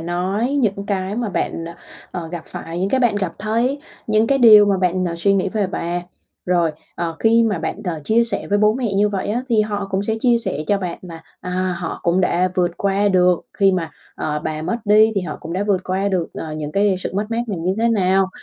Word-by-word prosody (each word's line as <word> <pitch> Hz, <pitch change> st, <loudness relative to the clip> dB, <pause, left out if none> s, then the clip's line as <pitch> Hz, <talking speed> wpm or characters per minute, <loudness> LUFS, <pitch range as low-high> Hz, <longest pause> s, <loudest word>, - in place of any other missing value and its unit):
nói 185 Hz, +9 st, -1 dB
những 205 Hz, -8 st, 0 dB
cái 195 Hz, 0 st, -2 dB
mà 240 Hz, -2 st, -1 dB
bạn, 165 Hz, -3 st, -2 dB
à, 170 Hz, -, -10 dB, 0.3 s
ờ, 170 Hz, -2 st, -5 dB
gặp 170 Hz, -1 st, -6 dB
phải, 170 Hz, +2 st, -6 dB
những 190 Hz, -, +1 dB
cái 265 Hz, -, +2 dB
bạn 240 Hz, -4 st, +2 dB
gặp 190 Hz, -4 st, -2 dB
thấy, 235 Hz, +7 st, 0 dB, 0.3 s
những 215 Hz, +1 st, +3 dB
cái 275 Hz, +3 st, +2 dB
điều 215 Hz, -4 st, +8 dB
mà 200 Hz, -1 st, +2 dB
bạn, 185 Hz, 0 st, 0 dB
à, 170 Hz, -, -4 dB
suy 195 Hz, +4 st, +2 dB
nghĩ 195 Hz, 0 st, +1 dB
về 205 Hz, 0 st, -1 dB
bà. 175 Hz, -1 st, -3 dB, 0.4 s
Rồi, 175 Hz, -2 st, +2 dB, 0.2 s
ờ, 165 Hz, -1 st, -3 dB
khi 230 Hz, +1 st, +4 dB
mà 215 Hz, -5 st, +1 dB
bạn, -, -, -4 dB
đ 185 Hz, -, -4 dB, 0.2 s
chia 230 Hz, +6 st, +3 dB
sẻ 230 Hz, -, -2 dB
với 205 Hz, -, +1 dB
bố 210 Hz, +1 st, +4 dB
mẹ 240 Hz, -5 st, -2 dB
như 205 Hz, +2 st, +3 dB
vậy 200 Hz, -2 st, -3 dB
á, 240 Hz, +4 st, -1 dB
thì 225 Hz, -3 st, +3 dB
họ 205 Hz, -2 st, -2 dB
cũng 195 Hz, 0 st, 0 dB
sẽ 220 Hz, +2 st, -1 dB
chia 240 Hz, -1 st, +3 dB
sẻ 230 Hz, -, -2 dB
cho 205 Hz, -, +2 dB
bạn 180 Hz, -3 st, -4 dB
là, 165 Hz, -3 st, -10 dB, 0.2 s
à, 180 Hz, -, -6 dB, 0.3 s
họ 170 Hz, -2 st, -5 dB
cũng 175 Hz, +2 st, +2 dB
đã 180 Hz, 0 st, +2 dB
vượt 180 Hz, -1 st, +2 dB
qua 200 Hz, +1 st, +1 dB
được 180 Hz, -2 st, +3 dB
khi 195 Hz, -2 st, +3 dB
mà, 170 Hz, -3 st, -2 dB, 0.2 s
ờ, 150 Hz, -1 st, -3 dB
bà 155 Hz, 0 st, -3 dB
mất 230 Hz, -, -1 dB
đi, 215 Hz, +2 st, +5 dB
thì 195 Hz, -, +1 dB
họ 170 Hz, -4 st, -5 dB
cũng 165 Hz, -, -7 dB
đã 190 Hz, +3 st, -1 dB
vượt 200 Hz, -3 st, +1 dB
qua 190 Hz, +2 st, 0 dB
được, 180 Hz, -4 st, 0 dB
ờ, 155 Hz, -, -6 dB
những 150 Hz, -1 st, -5 dB
cái 200 Hz, +1 st, +2 dB
sự -, -, -4 dB
mất 205 Hz, +2 st, 0 dB
mát 230 Hz, +1 st, 0 dB
này 205 Hz, -6 st, -3 dB
như 180 Hz, +3 st, -1 dB
thế 230 Hz, +1 st, +2 dB
nào. 190 Hz, -3 st, +2 dB
195 Hz, 250 wpm, -20 LUFS, 175-215 Hz, 0.4 s, điều